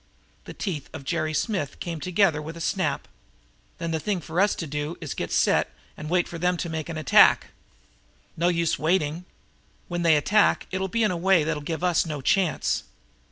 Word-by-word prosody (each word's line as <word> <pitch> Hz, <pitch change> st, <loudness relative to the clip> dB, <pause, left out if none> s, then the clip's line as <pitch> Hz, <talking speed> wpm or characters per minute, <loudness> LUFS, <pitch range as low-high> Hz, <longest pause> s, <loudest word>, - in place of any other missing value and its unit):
The -, -, -9 dB
teeth 160 Hz, -9 st, -4 dB
of -, -, -7 dB
Jerry 155 Hz, +2 st, -1 dB
Smith 155 Hz, -, -2 dB
came 170 Hz, -2 st, -4 dB
together 180 Hz, -2 st, +2 dB
with 160 Hz, +2 st, -7 dB
a -, -, -8 dB
snap. -, -, -1 dB, 0.7 s
"Then 165 Hz, 0 st, -3 dB
the 160 Hz, -, -1 dB
thing 190 Hz, +4 st, -1 dB
for 165 Hz, +3 st, -1 dB
us 205 Hz, +1 st, +3 dB
to 165 Hz, -, -4 dB
do 150 Hz, +2 st, -4 dB
is 155 Hz, -5 st, -6 dB
to -, -, -4 dB
get -, -, -4 dB
set -, -, +2 dB, 0.2 s
and 150 Hz, -, -7 dB
wait 175 Hz, 0 st, +2 dB
for 170 Hz, -, -7 dB
them 180 Hz, +1 st, +1 dB
to 170 Hz, -, -3 dB
make 160 Hz, 0 st, -4 dB
an 165 Hz, -, -4 dB
attack?" 155 Hz, -, +5 dB, 0.9 s
"No 170 Hz, +2 st, +1 dB
use 170 Hz, -4 st, +1 dB
waiting. 160 Hz, +1 st, 0 dB, 0.6 s
When 175 Hz, -1 st, -2 dB
they 165 Hz, -2 st, +5 dB
attack 205 Hz, +8 st, +3 dB
it'll 190 Hz, +1 st, -1 dB
be 230 Hz, +4 st, 0 dB
in 210 Hz, -, +2 dB
a 180 Hz, -, -2 dB
way 180 Hz, -1 st, +3 dB
that'll 150 Hz, -1 st, -2 dB
give 160 Hz, +3 st, -4 dB
us 180 Hz, -2 st, +3 dB
no 155 Hz, -3 st, -5 dB
chance." 175 Hz, +5 st, +1 dB
170 Hz, 205 wpm, -25 LUFS, 155-180 Hz, 0.9 s, attack